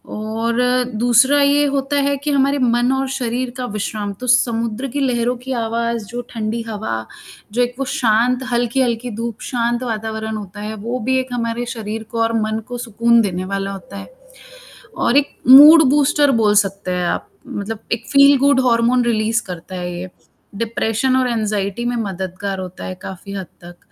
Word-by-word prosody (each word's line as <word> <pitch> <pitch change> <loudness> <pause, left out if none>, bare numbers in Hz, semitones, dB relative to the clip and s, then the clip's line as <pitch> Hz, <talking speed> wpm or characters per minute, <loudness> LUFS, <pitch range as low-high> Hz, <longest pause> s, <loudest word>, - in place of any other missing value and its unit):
और 225 +2 -2 0.4
दूसरा 245 +5 +4
ये 285 +1 +3
होता 275 +1 -1
है 280 - +1
कि 295 - 0
हमारे 280 +1 +2
मन 240 0 +2
और 265 0 -1
शरीर 250 -1 -2
का 255 - -3
विश्राम 205 -1 -3
तो 250 - -5
समुद्र 235 0 +1
की 285 +4 -3
लहरों 245 -2 0
की 255 +2 -8
आवाज़ 230 0 -2
जो 240 +3 -5
ठंडी 225 0 -3
हवा, 200 - -4 0.5
जो 245 - +1
एक 245 0 -3
वो 270 - -1
शांत 245 +2 +2
हल्की-हल्की 240 0 0
धूप 230 -1 -5
शांत 240 0 -1
वातावरण 220 -1 -4
होता 205 0 -9
है, 215 +1 -5
वो 235 +4 -4
भी 260 +3 0
एक 255 -1 -5
हमारे 235 0 -2
शरीर 220 0 -5
को 230 -1 -2
और 225 0 0
मन 215 +1 -1
को 245 - -5
सुकून 235 0 +2
देने 185 -3 -2
वाला 195 0 -3
होता 195 0 -9
है। - - -8 0.9
और 245 - +2
एक 285 - -1
मूड 300 +5 +10
बूस्टर 290 0 +3
बोल 210 -1 +3
सकते 195 -1 -6
हैं 180 -1 -1
आप, - - -2 0.2
मतलब 210 +2 -5
एक 230 0 -2
फील 280 0 +7
गुड 280 0 +3
हॉर्मोन 240 +1 +3
रिलीज़ 225 0 +1
करता 180 0 -8
है, 175 0 -4
ये। 185 +1 -7 0.5
डिप्रेशन 230 +3 0
और 255 -1 +2
एग्ज़ायटी 215 -1 -2
में 245 0 -1
मददगार 190 -2 -4
होता 185 -1 -8
है 185 - -5
काफ़ी 190 +1 -8
हद 195 -2 -5 0.2
तक। 175 0 -11
230 Hz, 180 wpm, -19 LUFS, 210-250 Hz, 0.9 s, मूड